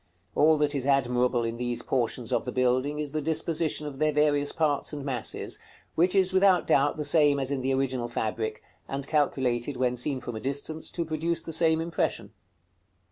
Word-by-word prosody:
All 155 +1 +4
that 150 0 +1
is 135 -2 -1
admirable 125 -3 +2
in 115 0 -3
these 120 -1 -2
portions 125 -1 -1
of - - +1
the 125 - -3
building 130 +3 +1
is 150 -2 -3
the 155 +1 -2
disposition 160 0 -1
of 140 -2 -7
their 155 0 +2
various 145 -1 +2
parts 150 -3 0
and 145 -2 -5
masses, 125 -6 -3 0.3
which 180 +4 +2
is 190 -1 +4
without 190 -2 +4
doubt 145 +2 +2
the 150 - -3
same 145 -1 +3
as 135 0 -1
in 135 -2 -1
the 135 +1 0
original 130 -3 -1
fabric, 110 -1 -3 0.2
and 135 0 -4
calculated, 135 -4 0
when 125 -1 +1
seen 130 +2 -1
from 120 -2 -6
a - - -4
distance, 140 +5 -3
to 170 - -3
produce 165 +1 -1
the 165 - -6
same 160 0 +4
impression. 165 0 -2
140 Hz, 190 wpm, -27 LUFS, 125-155 Hz, 0.3 s, All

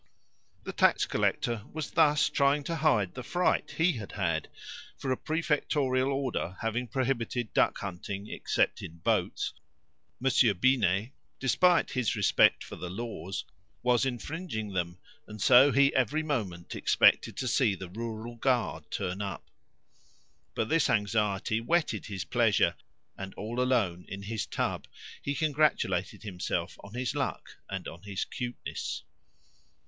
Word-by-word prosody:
The - - -5
tax - - +4
collector 115 -3 0
was 155 -2 -4
thus 150 -2 +4
trying 140 +1 +2
to 165 +3 -3
hide 115 - +2
the 125 - -6
fright 175 +8 0
he 165 +3 +4
had 105 -3 -7
had, 85 -6 -1 0.5
for 135 - -3
a - - +3
prefectorial 145 -4 0
order 130 -9 -2
having 115 +2 -1
prohibited 125 -2 -1
duckhunting 100 +1 -1
except - - 0
in 85 - -8
boats, 85 - 0 0.7
Monsieur 120 -4 +4
Binet, 105 -1 +2 0.3
despite 175 +7 +3
his 120 -5 0
respect 105 -3 +4
for - - -8
the 90 - -5
laws, 95 -3 -5 0.4
was 125 0 +3
infringing 125 - -3
them, 85 -1 -2 0.3
and 105 0 -9
so 130 +6 +7
he 140 0 +4
every 130 +5 +1
moment 100 - -3
expected - - +3
to 130 - -2
see 115 -4 +3
the 95 0 -7
rural 115 +2 -5
guard 125 0 0
turn 95 0 -3
up. 100 -1 -6 1.0
But 110 - 0
this 165 +5 +2
anxiety 105 0 +1
whetted 165 +7 0
his 100 -4 -4
pleasure, 115 -4 +3 0.5
and, 95 0 -6
all 115 +4 -3
alone 105 -9 +1
in 100 0 -7
his 110 0 -3
tub, - - -2 0.3
he 140 - -2
congratulated 150 - +1
himself 95 -4 -3
on 100 +3 -11
his 125 0 -1
luck - - -3
and - - -4
on 85 - -9
his 100 -1 -3
cuteness. 125 0 -5
115 Hz, 140 wpm, -29 LUFS, 100-135 Hz, 1.0 s, so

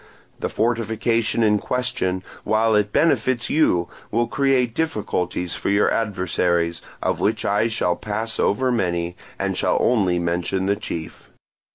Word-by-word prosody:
The - - -2
fortification 115 0 0
in 105 -1 +3
question, 95 -8 -1 0.2
while 110 +1 +2
it 105 -1 +2
benefits 130 -5 +2
you, 90 - +3 0.2
will 120 +2 +1
create 130 -1 +1
difficulties 105 - -2
for - - -3
your 100 +1 +3
adversaries, 90 -5 0 0.2
of - - 0
which 110 +1 0
I 105 +3 +2
shall 90 -6 0
pass 110 +1 -4
over 130 +5 +2
many, 85 -6 -1 0.2
and - - -1
shall - - +1
only 95 -8 +2
mention 85 +2 -1
the 100 +1 +2
chief. 85 -6 -7
105 Hz, 140 wpm, -22 LUFS, 90-115 Hz, 0.2 s, in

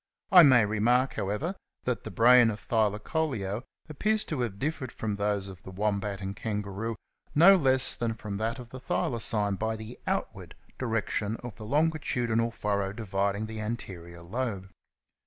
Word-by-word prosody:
I 180 -2 +10
may 130 -8 +7
remark, 120 +5 +2
however, 105 - -2 0.3
that 125 -1 -2
the - - -4
brain 120 +4 +6
of 105 -1 -4
Thylacoleo 110 0 -1 0.3
appears 210 +8 +1
to 150 - -3
have 120 -5 -1
difl^ered 130 +3 -3
from 110 -2 -3
those 100 -1 -1
of 95 -2 -10
the - - -10
Wombat 100 0 -2
and 95 0 -4
Kangaroo 105 +1 -3 0.4
no 175 +6 +8
less 130 -6 +3
than 115 -1 -2
from 105 -3 -5
that 115 +4 -2
of 125 -2 -10
the 130 - -7
Thylacine 110 -5 0
by 110 0 -1
the 110 +2 -9
outward - - -3 0.2
direction 110 -3 -1
of 120 -3 -6
the 110 - -8
longitudinal 125 -5 +1
furrow 100 -3 -2
dividing 100 -1 -1
the 110 0 -6
anterior 85 -6 -6
lobe. 100 -1 -4
110 Hz, 155 wpm, -28 LUFS, 100-125 Hz, 0.4 s, I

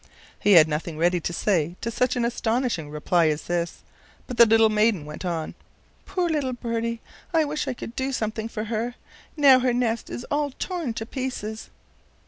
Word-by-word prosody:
He 205 - +4
had 160 -3 +8
nothing 155 +1 -3
ready 175 +2 +2
to 170 - -3
say 175 -2 0
to 230 - -2
such 250 +2 +1
an 240 -1 +1
astonishing 235 - -1
reply 160 +3 +2
as 155 0 -1
this, 175 -1 -3 0.4
but 250 - -7
the 235 - +8
little 225 0 +6
maiden 210 -6 +2
went 150 +4 -8
on: 165 -3 -3 0.5
"Poor 360 -2 0
little 290 -6 -1
birdie! 230 -1 -3 0.3
I 320 -1 +4
wish 295 0 -3
I 260 - -2
could 235 - -8
do 265 +1 -1
something 220 -2 -2
for 215 -1 -4
her. 230 +2 -3 0.4
Now 275 -3 +7
her 250 -1 +1
nest 235 -2 -1
is 245 - -5
all 290 0 +1
torn 335 -11 -3
to 225 - -4
pieces." 225 -4 -5
225 Hz, 185 wpm, -25 LUFS, 175-250 Hz, 0.5 s, had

